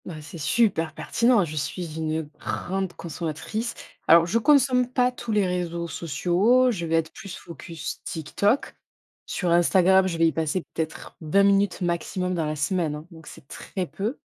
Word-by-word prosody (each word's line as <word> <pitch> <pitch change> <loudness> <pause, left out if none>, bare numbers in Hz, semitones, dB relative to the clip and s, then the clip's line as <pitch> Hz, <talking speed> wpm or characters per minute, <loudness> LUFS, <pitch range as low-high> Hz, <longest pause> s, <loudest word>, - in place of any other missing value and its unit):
Bah, 160 -4 -7
c'est 160 +2 -10
super 165 -3 +1
pertinent. 235 -5 +2
Je 155 -1 -7
suis 155 +2 -4
une 160 0 -1 0.2
grande 190 0 -3
consommatrice. 170 +8 -4 0.3
Alors, 165 +1 +7
je 200 +7 +1
consomme 255 -1 +4
pas 250 -1 +2
tous 240 -2 -6
les 210 -2 +3
réseaux 175 -2 -2
sociaux. 185 - +2
Je 170 -7 -3
vais 165 - +1
être 165 -1 0
plus 195 -4 -8
focus 165 -1 -8
TikTok. 200 - 0 0.5
Sur 180 -3 -1
Instagram, 185 +2 +5
je 170 -3 -3
vais 165 - +4
y - - +2
passer 160 +3 -1
peut-être 160 0 -5
20 165 +6 +3
minutes 200 -1 +3
maximum 180 +1 -1
dans 165 -3 -1
la 155 - -2
semaine, 160 0 0
hein. 150 +2 -9
Donc, 160 -2 -13
c'est 135 - -13
très 185 +5 -5
peu. 210 - -4
175 Hz, 170 wpm, -25 LUFS, 160-200 Hz, 0.5 s, Alors